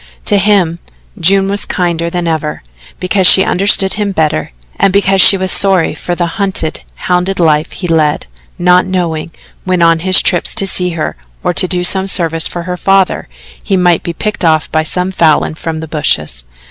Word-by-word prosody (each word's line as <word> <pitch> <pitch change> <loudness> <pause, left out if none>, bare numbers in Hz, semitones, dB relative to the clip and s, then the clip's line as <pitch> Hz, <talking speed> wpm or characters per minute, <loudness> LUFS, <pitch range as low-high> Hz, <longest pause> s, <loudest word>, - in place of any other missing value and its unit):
To 205 - +2
him, 190 -4 +1 0.4
June 195 +2 +3
was 200 0 -3
kinder 170 -2 -2
than 175 0 -3
ever, 155 - -3 0.4
because 185 0 +1
she 190 - +7
understood 195 0 +2
him 205 -1 -2
better 155 - -1 0.3
and 195 - +3
because 195 -1 +2
she 195 - +7
was 185 0 -1
sorry 190 -5 +2
for 175 +3 -5
the 175 - -1
hunted, 175 -2 -3
hounded 180 +2 -2
life 155 -1 +1
he 180 - -5
led, 155 - 0 0.3
not 180 +1 +3
knowing, 170 -4 -3 0.3
when 185 -2 0
on 165 -1 +3
his 185 +2 +3
trips 175 -3 0
to 195 - 0
see 180 -1 0
her 155 - -4 0.3
or - - 0
to 185 - +1
do 180 -1 +1
some 190 +2 +3
service 165 -4 +1
for 175 - -6
her 180 +1 -5
father, 195 0 +1 0.4
he 195 - 0
might 175 -2 +2
be 170 - -5
picked 210 +3 -4
off 160 -2 +1
by 155 - +1
some 180 +4 -3
Falin 160 -4 +1
from 160 0 -6
the 160 - -7
bushes. 80 - -2
180 Hz, 185 wpm, -12 LUFS, 165-190 Hz, 0.4 s, she